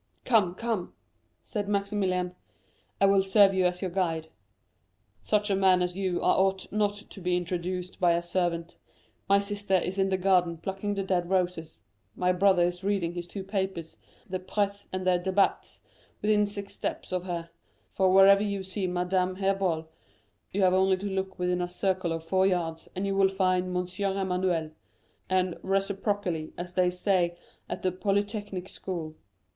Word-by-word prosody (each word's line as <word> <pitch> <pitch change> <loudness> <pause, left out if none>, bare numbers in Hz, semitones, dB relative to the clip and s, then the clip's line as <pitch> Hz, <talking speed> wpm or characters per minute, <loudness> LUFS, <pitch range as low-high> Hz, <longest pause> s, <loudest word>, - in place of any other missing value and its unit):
"Come, 205 -8 +3
come," 225 -5 -3 0.5
said 205 -3 -3
Maximilian, 195 -3 0 0.7
"I 195 - +5
will 195 0 +5
serve 195 +1 +5
as 180 0 +1
your 185 - -2
guide; 165 -4 -1 0.9
such 210 -1 +1
a - - +3
man 190 -2 +4
as 180 0 -2
you 185 -2 -1
are - - +4
ought 190 0 0
not 210 -1 +1
to 195 - -11
be 180 0 +1
introduced 180 +1 -4
by 175 -2 +4
a 170 0 0
servant. 175 -1 -2 0.5
My 200 - +6
sister 200 -1 -1
is 185 +2 0
in 195 0 +2
the 190 - +1
garden 180 -3 +2
plucking 195 +4 -3
the 195 - -1
dead 180 -2 0
roses; 180 -4 -1 0.3
my 180 0 +2
brother 185 -1 +4
is 175 +1 -1
reading 195 -4 0
his 175 0 -5
two 195 +2 -6
papers, 190 -4 -3 0.3
la 185 0 -3
Presse 200 +2 -2
and 185 0 -3
les 180 -1 +3
Débats, 190 +2 0 0.4
within 210 -1 +3
six 200 -1 -5
steps - - -4
of 180 0 -2
her; 170 -2 -4 0.4
for 190 -1 +2
wherever 195 +1 +7
you 200 -2 -2
see 190 0 -3
Madame 180 +1 0
Herbault, 190 -4 0 0.6
you 195 0 +1
have 185 -1 +5
only 190 0 +3
to 195 - -7
look 190 -1 -3
within 180 0 0
a 175 - -2
circle 185 -1 -1
of 165 0 -3
four 190 +3 +2
yards 165 -3 -2
and 190 +2 -2
you 195 0 -1
will 195 -1 +4
find 185 -1 +1
M. 180 0 -1 0.3
Emmanuel, 180 -4 0 0.6
and 185 -2 +1
'reciprocally,' 195 -4 -1
as 175 +1 -6
they 180 -1 +3
say 180 -1 +1 0.3
at - - -5
the 185 - +2
Polytechnic 205 0 -2
School." 170 -5 -5
185 Hz, 170 wpm, -28 LUFS, 180-195 Hz, 0.9 s, wherever